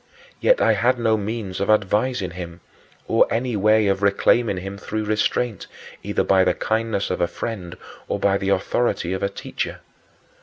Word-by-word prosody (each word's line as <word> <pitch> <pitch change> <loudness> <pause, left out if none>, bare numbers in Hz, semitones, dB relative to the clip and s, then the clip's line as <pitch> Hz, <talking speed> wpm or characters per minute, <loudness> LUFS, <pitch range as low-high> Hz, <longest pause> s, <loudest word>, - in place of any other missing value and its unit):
Yet - - +4
I - - +4
had 125 +2 +2
no 115 -2 +2
means 105 -2 -4
of 100 - -1
advising 105 0 +1
him, 85 -1 -8 0.5
or - - +4
any 120 0 -1
way 110 +1 +3
of 100 0 +1
reclaiming 100 +1 +2
him 95 +2 -6
through 110 +1 -3
restraint, 110 +1 -1 0.3
either - - -1
by 95 -1 +4
the - - +1
kindness 110 -3 -1
of 90 - -2
a 85 - +3
friend 90 0 -6 0.3
or - - -1
by 100 0 +2
the 95 - -2
authority 95 -1 0
of 95 - -3
a 100 - 0
teacher. - - -5
100 Hz, 175 wpm, -22 LUFS, 95-115 Hz, 0.5 s, Yet